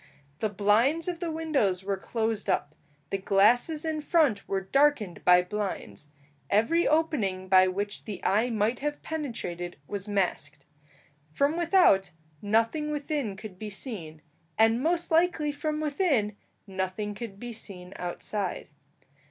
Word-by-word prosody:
The 215 - 0
blinds 220 - +2
of 350 -2 -3
the 345 -1 -3
windows 285 - 0
were 200 0 -1
closed 220 +1 -2
up. 145 +1 0 0.4
The 195 - -1
glasses 245 - +3
in 315 -1 -1
front 295 - +2
were 195 -1 -1
darkened 225 -3 +1
by 180 0 +6
blinds; 180 - -5 0.4
every 230 +12 +3
opening 245 - 0
by 185 0 +6
which 200 +2 -3
the 205 -4 -6
eye 220 +5 +2
might 225 +1 0
have 295 +1 -3
penetrated 225 - -4
was 200 +5 -5
masked. 150 -8 -2 0.6
From 280 - +1
without, 335 - +4 0.3
nothing 230 +9 +1
within 290 -7 -2
could 195 -2 -10
be 215 - -5
seen, 185 - -7 0.3
and 225 +2 +4
most 335 +3 0
likely 325 -2 +2
from 305 +1 -3
within, 285 - +1 0.3
nothing 190 +1 -3
could 205 -2 -8
be 240 +1 -6
seen 190 -4 -8
outside. 185 +2 -4
215 Hz, 135 wpm, -28 LUFS, 195-295 Hz, 0.6 s, by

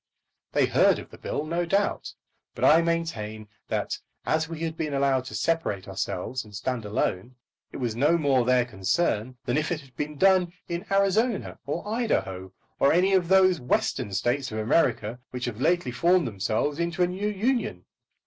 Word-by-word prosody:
They - - +4
heard - - +4
of - - -10
the - - -12
bill, 150 - -3
no 170 +2 -1
doubt; 195 +4 -1 0.4
but - - 0
I 160 +2 +7
maintain 120 -11 -2 0.2
that, - - -2 0.3
as 160 +1 0
we 165 -1 -6
had 165 -1 -2
been 155 -3 -2
allowed 135 -2 +2
to - - -7
separate 165 - -1
ourselves 95 +5 -3
and 105 -1 -13
stand 115 +1 -3
alone, 105 +3 -2 0.4
it - - -7
was 120 -4 -2
no 150 +8 +3
more 140 -5 +2
their 125 0 +3
concern 120 - -1
than 125 - 0
if 155 - -2
it 160 -3 -2
had 135 -2 -20
been 150 0 -4
done 185 0 +4
in 175 +5 -5
Arizona 200 +3 +1
or 170 +7 -3
Idaho, 95 - -1 0.3
or 140 - +5
any 185 +3 +3
of 185 -3 +3
those 185 -3 +4
Western 125 -4 0
States 120 +7 -1
of 110 - -4
America 115 -1 +1
which 125 -1 -4
have 120 -1 -5
lately 175 -5 +2
formed 170 +6 +3
themselves 110 - -1
into 170 +2 0
a - - +3
new 190 +4 -3
union. 210 - -1
145 Hz, 180 wpm, -26 LUFS, 120-175 Hz, 0.4 s, I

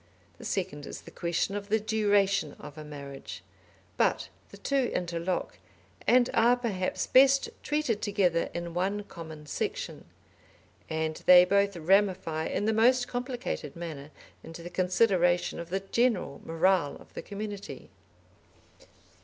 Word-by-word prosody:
The - - -9
second 175 -7 -3
is - - -7
the - - -13
question 175 +3 -1
of 205 0 -5
the 220 +1 +3
duration 205 -6 +2
of 150 0 -11
a 155 - -8
marriage. 140 -2 -9 0.5
But - - +1 0.2
the - - -12
two 275 -3 0
interlock, 175 +1 -2 0.5
and 245 0 +5
are, 240 +2 +4
perhaps, 200 -7 -2
best 270 +1 +5
treated 295 -8 -1
together 190 -5 +1
in 170 -1 -5
one 195 +4 -1
common 160 -5 -10
section. 145 - -4 0.8
And 160 0 -2
they 180 0 +9
both 200 0 +2
ramify 170 -2 +2
in 205 - -1
the 220 - +2
most 245 +3 +4
complicated 245 - -4
manner 155 -4 -7 0.3
into 165 +1 -9
the 175 - -8
consideration 180 -1 +2
of 170 0 -7
the 190 +2 -1
general 195 - 0
morale 165 -2 +2
of - - -16
the - - -5
community. 205 -1 -7
190 Hz, 135 wpm, -29 LUFS, 165-215 Hz, 0.8 s, they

